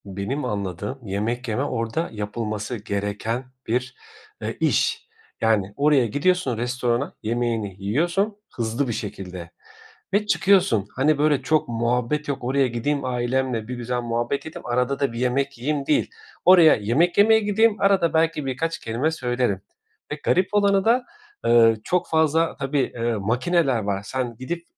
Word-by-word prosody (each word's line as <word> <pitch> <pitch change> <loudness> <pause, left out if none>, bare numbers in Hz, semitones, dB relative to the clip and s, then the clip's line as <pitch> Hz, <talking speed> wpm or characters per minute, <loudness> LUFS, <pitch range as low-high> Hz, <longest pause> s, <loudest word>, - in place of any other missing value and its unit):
Benim 100 +9 -4
anladığım 100 +4 -4
yemek 115 +6 -2
yeme 115 +4 -1
orda 140 +5 -2
yapılması 105 +2 -4
gereken 105 +3 -3 0.2
bir, 125 +3 -1 0.5
eee, - - -4
iş. - - +1 0.3
Yani, 105 -3 +1
oraya 145 -3 +3
gidiyorsun 145 - +1
restorana 125 +2 -1
yemeğini 115 -3 -1
yiyorsun 175 - 0 0.2
hızlı 115 +4 -1
bir 120 - -2
şekilde 90 -5 -6 0.6
ve 210 +1 +2
çıkıyorsun. 185 - +3
Hani, 145 +3 +2
böyle, 150 -1 +2
çok 155 -1 +1
muhabbet 120 +5 -1
yok. 140 -3 -3
Oraya 135 +2 +2
gideyim 130 +4 -2
ailemle 125 -2 -1
bir 125 - -4
güzel 120 0 -3
muhabbet 120 +3 -2
edeyim. 160 - -9
Arada 125 +3 0
da 140 -4 0
bir 115 - -5
yemek 135 +2 0
yiyeyim, 140 +3 -2
değil. 150 - +1 0.4
Oraya 175 -4 +8
yemek 130 +12 +1
yemeye 220 +2 +6
gideyim. 210 +1 +3
Arada 195 -4 +3
belki 160 -2 +1
birkaç 160 +6 -2
kelime 125 +8 -1
söylerim 125 -8 -1 0.5
ve - - -1
garip 185 +1 +2
olanı 200 -1 +3
da, 245 +2 +3 0.4
eee, 115 -1 +6
çok 180 0 0
fazla, 160 +1 +2
tabii, 140 +1 -1 0.2
eee, 120 0 -1
makineler 125 - +1
var. 100 -2 -2
Sen 125 0 -3
gidip 170 +7 -5
125 Hz, 150 wpm, -23 LUFS, 115-155 Hz, 0.6 s, Oraya